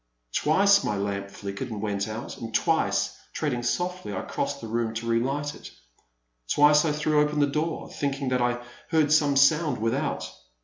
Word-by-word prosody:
Twice 200 +6 +4
my 105 - -1
lamp 100 0 -3
flickered 100 +5 -6
and 110 -2 -5
went 100 -1 -2
out, 110 +2 -6
and 115 -1 -6
twice, - - +1 0.2
treading 135 -6 -1
softly, 175 - -2
I - - -2
crossed - - -3
the 115 - -7
room 115 0 -2
to 115 +1 -4
re 115 0 +2
light 145 +4 -2
it. - - -11 0.8
Twice 150 +1 +5
I 155 - +2
threw 150 0 +2
open 150 0 0
the 145 - +5
door, 155 +3 -2
thinking 140 -1 -2
that 125 -1 +1
I 120 0 0 0.3
heard 155 -2 +3
some 145 -2 +3
sound 150 +3 +4
without. 120 +7 -1
135 Hz, 180 wpm, -26 LUFS, 115-150 Hz, 0.8 s, Twice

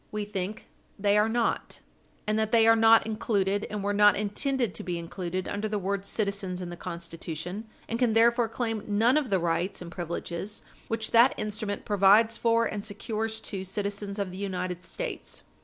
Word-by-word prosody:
We 210 -1 -3
think 205 0 -5 0.3
they 200 0 +2
are 210 +1 +4
not, 235 0 -1 0.5
and 215 +1 +1
that 220 0 0
they 225 -1 +5
are 225 0 +7
not 225 0 +6
included, 205 -2 0
and 210 -1 -4
were 205 0 0
not 205 0 +6
intended 230 +2 -1
to - - -5
be 175 -1 -3
included, 180 +2 -4
under 205 +2 -2
the 210 0 -1
word 200 0 -2
"citizens" 200 -4 -2
in 180 -1 -5
the - - -6
Constitution, 170 +4 -6 0.2
and 230 - -2
can 245 -3 +3
therefore 235 +1 +4
claim 225 -2 -2
none 225 +5 +3
of 300 -5 +1
the 195 - +3
rights 170 +2 -1
and 175 -1 -8
privileges 175 +3 -5 0.2
which 225 -1 -2
that 235 +3 +6
instrument 210 -1 -3
provides 210 +3 +5
for 230 0 +2
and 210 -2 -3
secures 220 +1 -3
to 195 -3 -5
citizens 200 +1 -4
of 200 -3 -2
the 185 - -8
United 185 -2 -3
States. - - -6
205 Hz, 185 wpm, -28 LUFS, 190-225 Hz, 0.5 s, are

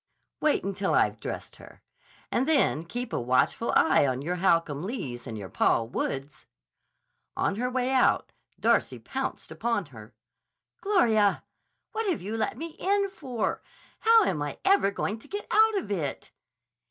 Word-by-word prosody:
Wait 305 -1 +2
until 195 0 -1
I've - - +2
dressed - - -6
her. - - -15 0.5
And 260 +4 +1
then 280 - +3
keep 245 +7 -5
a - - 0
watchful 130 - +1
eye 155 -3 +5
on 130 +1 -2
your 180 +4 -2
Holcomb 165 -5 +2
Lees 140 - -5
and 115 -2 -5
your 100 -2 -6
Paul 115 +4 +1
Woods!" 135 +3 -4 0.9
On 200 - 0
her 250 +2 -1
way 255 0 0
out 260 -1 +3 0.3
Darcy - - +2
pounced - - -5
upon 230 -5 -1
her. 110 -1 -12 0.7
"Gloria! 225 - +3 0.5
What 440 -1 -1
have 335 - -1
you 210 +4 -4
let 225 - -1
me 330 0 -6
in 395 0 +1
for? 255 - -3 0.4
How 455 0 +6
am 160 - -1
I 145 -1 -4
ever 385 - +4
going 205 +2 -3
to - - -16
get 410 +1 -5
out 440 0 +5
of 360 - -4
it?" 155 -8 -3
215 Hz, 160 wpm, -27 LUFS, -, 0.9 s, How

